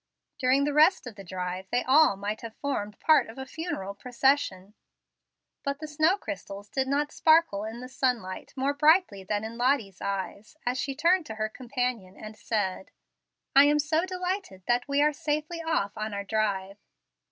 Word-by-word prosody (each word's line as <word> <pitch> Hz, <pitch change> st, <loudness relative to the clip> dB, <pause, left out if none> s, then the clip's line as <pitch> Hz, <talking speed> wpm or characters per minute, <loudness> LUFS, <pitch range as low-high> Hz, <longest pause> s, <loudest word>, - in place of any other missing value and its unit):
During 260 Hz, +2 st, +3 dB
the 290 Hz, 0 st, 0 dB
rest 310 Hz, +2 st, +5 dB
of 245 Hz, -, -7 dB
the 200 Hz, -1 st, -11 dB
drive 185 Hz, +1 st, -5 dB
they 245 Hz, -, +1 dB
all 280 Hz, -3 st, +5 dB
might 205 Hz, +2 st, -4 dB
have 230 Hz, -1 st, -8 dB
formed 210 Hz, -8 st, -3 dB
part 315 Hz, -1 st, +4 dB
of 225 Hz, -, -11 dB
a 265 Hz, -, -5 dB
funeral 265 Hz, -, -5 dB
procession. 235 Hz, -4 st, 0 dB, 0.9 s
But 280 Hz, 0 st, -2 dB
the 310 Hz, +1 st, -7 dB
snow 310 Hz, +5 st, +2 dB
crystals 200 Hz, -, -7 dB
did 265 Hz, -1 st, -1 dB
not 290 Hz, +2 st, 0 dB
sparkle 315 Hz, -11 st, +3 dB
in 225 Hz, +2 st, -7 dB
the 255 Hz, -, -7 dB
sunlight 250 Hz, -8 st, -2 dB
more 275 Hz, +1 st, 0 dB
brightly 300 Hz, -, +3 dB
than 215 Hz, +4 st, -3 dB
Lottie's 245 Hz, -7 st, +1 dB
eyes, 200 Hz, +6 st, -4 dB
as 250 Hz, +1 st, 0 dB
she 275 Hz, -1 st, -2 dB
turned 340 Hz, +3 st, +2 dB
to 220 Hz, -, -6 dB
her 215 Hz, 0 st, -2 dB
companion, 245 Hz, -5 st, -3 dB
and 215 Hz, 0 st, -9 dB
said, 205 Hz, -4 st, -2 dB, 0.7 s
"I 275 Hz, +1 st, +9 dB
am 295 Hz, +1 st, +4 dB
so 310 Hz, +3 st, +1 dB
delighted 365 Hz, -, -4 dB
that 245 Hz, +2 st, +1 dB
we 280 Hz, +1 st, +2 dB
are 300 Hz, 0 st, +3 dB
safely 305 Hz, +2 st, -2 dB
off 320 Hz, -12 st, -1 dB
on 215 Hz, -1 st, -4 dB
our 200 Hz, -, -3 dB
drive." 200 Hz, -2 st, -1 dB
250 Hz, 175 wpm, -27 LUFS, 205-295 Hz, 0.9 s, I